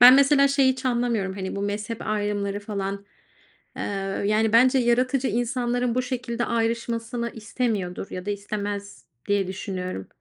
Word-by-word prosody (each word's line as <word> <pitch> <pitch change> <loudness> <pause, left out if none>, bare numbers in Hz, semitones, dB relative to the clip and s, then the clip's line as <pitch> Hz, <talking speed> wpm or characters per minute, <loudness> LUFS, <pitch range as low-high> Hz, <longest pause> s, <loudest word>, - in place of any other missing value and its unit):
Ben 250 +1 +11
mesela 280 0 +6
şeyi 275 -2 +4
hiç 260 +1 -9
anlamıyorum, 235 -6 0
hani, 190 0 -4
bu 200 - -2
mezhep 210 +2 -3
ayrımları 205 -1 -1
falan, 200 -1 -4 0.7
ııı, 195 0 -2
yani, 215 +1 +2
bence 255 +3 +6
yaratıcı 250 +2 +2
insanların 245 +1 0
bu 255 - +1
şekilde 240 -1 -2
ayrışmasını 230 0 -1
istemiyordur 210 -5 -2
ya 185 +1 -6
da - - 0
istemez 205 0 -4 0.2
diye 200 -2 +2
düşünüyorum. 185 - -4
225 Hz, 140 wpm, -25 LUFS, 200-245 Hz, 0.7 s, Ben